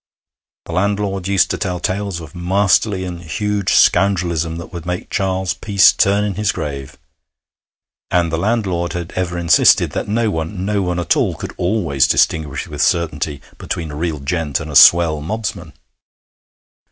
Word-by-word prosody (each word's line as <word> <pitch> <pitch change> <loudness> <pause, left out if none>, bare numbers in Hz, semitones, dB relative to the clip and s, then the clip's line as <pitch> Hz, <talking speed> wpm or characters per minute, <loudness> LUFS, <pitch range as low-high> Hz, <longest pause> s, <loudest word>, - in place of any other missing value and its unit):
The - - -8
landlord 100 +1 -1
used 100 -1 +2
to - - -3
tell 90 -3 -2
tales 95 0 -3
of 80 - -11
masterly 95 +2 +1
and 90 -1 -6
huge 100 +4 -2
scoundrelism 85 -4 +2
that 85 +2 -9
would 85 -2 -6
make 90 +1 -5
Charles 95 -2 -1
Peace 100 -2 +4
turn 100 +1 +2
in 105 -1 -2
his 105 +1 0
grave. 70 -2 -6 1.1
And 85 -2 +1
the 80 - -1
landlord 95 -5 -1
had 85 0 -5
ever 90 -1 -2
insisted 85 -3 +4
that - - -4
no 110 +1 0
one, 90 +3 -4
no 105 0 0
one 90 -2 -2
at 85 - +1
all, - - 0
could - - -7
always 85 -8 +1
distinguish 75 -3 0
with 75 -2 -5
certainty 75 -4 -1 0.2
between 80 -3 -4
a - - -7
real 80 -1 -3
gent 75 0 -2
and 75 0 -7
a - - -7
swell 80 -1 +6
mobsman. 105 -1 -5
90 Hz, 165 wpm, -18 LUFS, 80-100 Hz, 1.1 s, swell